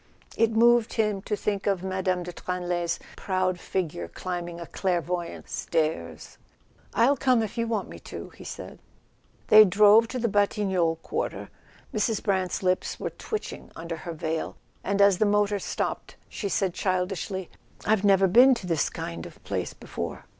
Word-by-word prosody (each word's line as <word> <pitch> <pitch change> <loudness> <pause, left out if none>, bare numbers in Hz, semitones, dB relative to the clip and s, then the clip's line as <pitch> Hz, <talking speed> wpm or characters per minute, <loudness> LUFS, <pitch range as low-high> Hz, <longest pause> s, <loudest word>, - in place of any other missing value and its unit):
It 230 - +3
moved 235 +1 +4
him 210 -3 0
to 210 - -2
think 200 -1 -2
of 195 -3 +1
Mme. 185 -1 -1
de 175 0 -7
Tranlay's 175 -1 -2 0.2
proud 185 -1 -1
figure 160 - -3
climbing 175 - -5
a 170 - -6
clairvoyantss 175 -1 -2
stairs. 120 - -2 0.6
"I'll 245 +5 +4
come 255 -3 +3
if 215 - -5
you 230 0 -1
want 220 -4 -1
me - - -10
to," - - -8
he - - -13
said. - - -8 0.7
They 215 0 +10
drove 210 +3 +6
to 255 - -4
the 235 -1 0
Batignolles 195 -5 +1
quarter. - - -3 0.4
Mrs. 215 0 0
Brant's 190 -2 0
lips 185 0 0
were - - -3
twitching 435 -2 -6
under 165 0 -5
her 170 +1 -6
veil, 160 0 -3 0.3
and 200 +1 +3
as 200 -3 +5
the 215 - +4
motor 205 0 +2
stopped - - -3
she 200 - -4
said 190 -2 0
childishly: 185 0 -2 0.3
"I've 210 -2 +2
never 195 -1 +5
been 250 +7 +7
to 200 - -7
this 165 -4 +1
kind 85 -1 -6
of - - -16
place - - -3
before." - - -6
190 Hz, 160 wpm, -26 LUFS, 175-210 Hz, 0.7 s, They